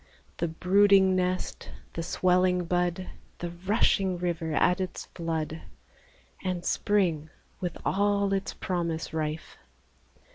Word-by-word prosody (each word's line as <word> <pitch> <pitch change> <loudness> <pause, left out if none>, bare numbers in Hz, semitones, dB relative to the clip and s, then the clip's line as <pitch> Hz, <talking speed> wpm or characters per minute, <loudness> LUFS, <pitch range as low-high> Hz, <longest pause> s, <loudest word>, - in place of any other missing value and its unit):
The 170 - 0
brooding 190 +3 +4
nest, 185 0 -2 0.2
the 165 - -3
swelling 180 +1 +2
bud, 180 +1 0 0.3
The 175 -1 -4
rushing 190 0 +1
river 170 -2 -2
at 180 +4 +3
its 185 - -4
flood, 160 -2 -3 0.8
And 180 -2 -2
Spring 175 -7 +1 0.3
with 180 -3 -3
all 200 0 +2
its 195 0 -1
promise 170 -3 -2
rife. 155 0 -4
180 Hz, 110 wpm, -28 LUFS, 165-190 Hz, 0.8 s, brooding